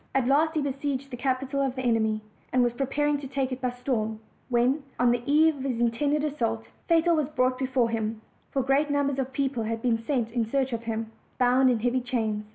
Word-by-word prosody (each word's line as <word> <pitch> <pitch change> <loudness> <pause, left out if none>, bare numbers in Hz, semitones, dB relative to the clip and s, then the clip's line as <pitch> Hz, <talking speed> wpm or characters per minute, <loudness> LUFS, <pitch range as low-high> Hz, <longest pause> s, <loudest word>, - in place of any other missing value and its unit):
At 265 -2 +3
last 310 +4 +3
he 305 - +1
besieged 275 0 -3
the - - -4
capital 265 +2 -1
of 265 -2 0
the 260 - -4
enemy, 220 -2 +1 0.3
and 250 -1 +3
was 240 -1 +1
preparing 285 +3 0
to 280 - -7
take 270 -1 -2
it 255 - -4
by 250 - +1
storm, 245 -3 -2 0.3
when, 250 +4 +2 0.2
on 245 0 +4
the 240 0 0
eve 310 0 +5
of - - -7
the 270 - -2
intended 285 +6 +1
assault, 115 - -1 0.2
Fatal 335 0 +4
was 300 -3 0
brought 255 -3 +1
before 255 -3 +1
him 220 -1 -2 0.3
(for 270 - 0
great 275 +3 +2
numbers 280 -1 0
of 265 0 -2
people 270 -3 -1
bad 225 0 -3
been 235 -2 +2
sent 240 -3 -1
in 235 0 0
search 265 -1 0
of 230 0 -4
nim), 225 0 -3 0.3
bound 255 +1 +4
in 235 -3 +1
heavy 245 +2 +1
chains. 220 -4 -2
255 Hz, 220 wpm, -27 LUFS, 235-275 Hz, 0.3 s, eve